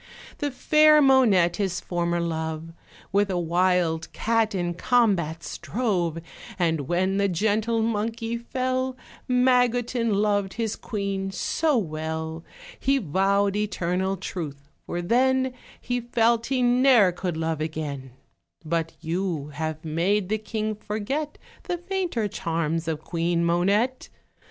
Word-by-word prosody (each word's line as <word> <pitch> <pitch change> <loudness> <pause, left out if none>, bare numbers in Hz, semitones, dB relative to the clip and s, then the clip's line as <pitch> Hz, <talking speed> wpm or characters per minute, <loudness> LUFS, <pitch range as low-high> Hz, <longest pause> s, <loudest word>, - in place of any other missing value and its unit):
The 290 - 0
fair 305 +3 +5
Monette, 240 - +4
his 195 -4 -1
former 175 -1 -1
love, 160 -1 -3 0.4
With 200 +1 +2
a 185 - -1
wild 175 -1 +1
cat 225 -2 +1
in 175 -2 -1
combat 175 -7 +1
strove; 185 -9 -2 0.4
And 160 -6 0
when 185 +3 +1
the 200 0 +2
gentle 220 +5 +1
monkey 225 +1 -2
fell, 255 +2 -2 0.3
Magotin 245 -2 +2
loved 205 -2 +1
his 225 -2 -2
queen 200 -2 -3
so 300 +9 0
well, 160 -3 -3 0.4
He 275 +1 +2
vowed 195 - +1
eternal 190 -2 -1
truth 145 -6 -6 0.2
for 175 0 -3
then, 260 +5 +2 0.3
He 245 0 -2
felt 235 0 +2
he 260 -2 +1
ne'er 245 -5 +5
could 175 -1 -4
love 160 -1 -2
again; 145 -5 -4 0.5
But 165 0 -1
you 165 -3 -2
have 155 +2 -4
made 180 +5 0
the 215 +1 0
king 215 0 -3
forget 215 +8 -4 0.3
The 355 - -2
fainter 350 - -2
charms 165 -4 -2
of 160 -2 -2
Queen 170 0 0
Monette. 200 +9 +1
195 Hz, 125 wpm, -25 LUFS, 170-235 Hz, 0.5 s, fair